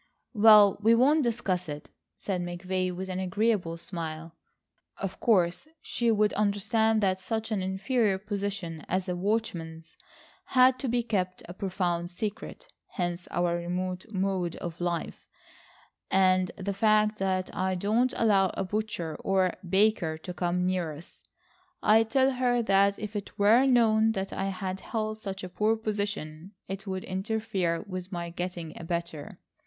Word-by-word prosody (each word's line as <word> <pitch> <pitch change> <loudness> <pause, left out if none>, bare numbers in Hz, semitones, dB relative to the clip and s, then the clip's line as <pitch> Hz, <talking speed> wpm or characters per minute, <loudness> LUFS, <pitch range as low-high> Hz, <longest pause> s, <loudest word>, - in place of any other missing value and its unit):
"Well, 210 -3 +7
we 225 +2 +5
won't 285 +6 +4
discuss 205 - -1
it," 145 0 -7 0.2
said 185 -3 -3
McVay 185 +1 -2
with 185 +1 -5
an 185 0 -3
agreeable 190 -2 0
smile. 165 -2 -6 0.6
"Of 195 -1 -5
course 180 - +2
she 235 -6 -1
could 210 -1 +2
understand 215 +2 +1
that 190 -1 +2
such 220 +3 -3
an 205 -3 0
inferior 195 +2 +1
position 200 -5 -4
as 185 +1 0
a 180 - -1
watchman's 175 -5 -3 0.5
had 255 0 +4
to 270 - -2
be 240 0 +1
kept 185 -5 -2
a 175 - -7
profound 180 -3 -2
secret, 205 +3 -6 0.3
hence 175 -1 -3
our 175 -1 0
remote 180 +3 -3
mode 190 -3 -1
of 170 0 -7
life, 175 -1 -3 0.8
and 185 -1 +3
the 200 0 -3
fact 215 +1 +3
that 185 -1 -1
I 185 0 0
don't 220 +7 +1
allow 195 -4 +4
a - - -1
butcher 195 -5 -3
or 190 -2 +1 0.2
baker 190 -5 +2
to 180 +3 -7
come 180 0 0
near 180 -4 -1
us. 155 +4 -13 0.6
I 220 +1 +6
tell 265 +3 +3
her 245 -2 +1
that 200 -1 +3
if 210 +1 -6
it 205 -1 -6
were 225 +6 +5
known 225 -3 +4
that 195 -2 -3
I 195 - -2
had 190 -1 -3
held 215 -1 -3
such 195 -3 -6
a 185 - -5
poor 215 +4 +1
position, 205 -5 -4
it 195 +1 -6
would 190 -1 -3
interfere 190 -3 -2
with 185 -2 -7
my 170 -2 -4
getting 175 -2 -5
a - - -8
better. 170 -3 -4
190 Hz, 155 wpm, -28 LUFS, 180-215 Hz, 0.8 s, Well